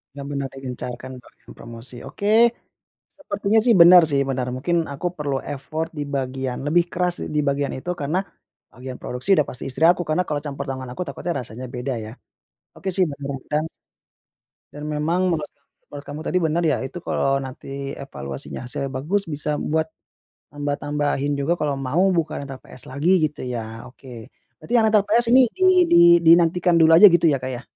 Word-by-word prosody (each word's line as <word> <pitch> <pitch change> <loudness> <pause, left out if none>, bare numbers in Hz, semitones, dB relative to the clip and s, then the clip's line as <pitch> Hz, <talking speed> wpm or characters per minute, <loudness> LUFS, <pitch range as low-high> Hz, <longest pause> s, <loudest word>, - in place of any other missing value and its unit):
Benar 140 -1 -7
benar 140 -1 -3
digencarkan 130 -1 -7
bagian - - -18
promosi 120 +1 -11
oke, 220 +4 +3 0.7
sepertinya 220 -6 0
sih 235 0 +4
benar 175 +1 +9
sih 140 -1 +2
benar 130 -1 -2
mungkin 170 +6 -1 0.2
aku 160 +6 -4
perlu 145 -3 -2 0.2
effort 155 +4 -4
di - - -1
bagian 130 -1 -3
lebih 170 +3 +3
keras 180 0 0 0.2
di - - +3
bagian 140 0 -1
itu 175 +7 -6
karena, 150 +6 -1 0.5
bagian 125 +1 -8
produksi 125 +8 -7
sudah 150 - +2
pasti 125 - -8
istri 145 +5 -1
aku 175 +1 +5
karena 180 +4 +1
kalau 145 -1 -1
campur 140 -1 -5
tangan 130 -1 -5
aku 180 - -5
takutnya 165 +5 -4
rasanya 125 +2 -8
beda 125 +2 -3
ya, - - -8 0.7
oke 190 - -6
sih 185 - +4
benar 140 0 -6
juga. 150 - -3 1.2
Dan 150 +1 -8
memang 165 +4 0
menurut 150 -2 -3
kamu - - -47 0.3
menurut 145 -1 -9
kamu 145 +2 -7
tadi 180 - -1
benar 165 0 +1
ya 155 -3 +2
itu 170 +6 -7
kalau 135 0 0
nanti 135 +1 -7
evaluasinya 70 - -7
hasilnya 135 -1 -4
bagus 185 +10 -1
bisa 150 -1 -2
buat, 160 +1 -1 0.6
tambah-tambahin 145 0 -2
juga 145 +5 0
kalau 150 -3 -1
mau 145 +8 +1
bukan 160 -4 -2
rental 135 -1 -9
PS 130 - -13
lagi 155 +8 +1
gitu 150 -1 -3
ya 115 -2 -6
oke, 125 -3 -12 0.3
berarti 235 - -9
yang 225 - +4
rental 215 -1 +4
PS 230 +2 +2
ini 255 -2 +6
di 375 - +1 0.2
di - - +4 0.2
dinantikan 170 +1 +4
dulu 160 0 +5
aja 195 +5 +10
gitu 175 -1 +2
ya 135 - -1
Kak 130 0 -4
ya. 125 - -9
145 Hz, 180 wpm, -22 LUFS, 135-170 Hz, 1.2 s, aja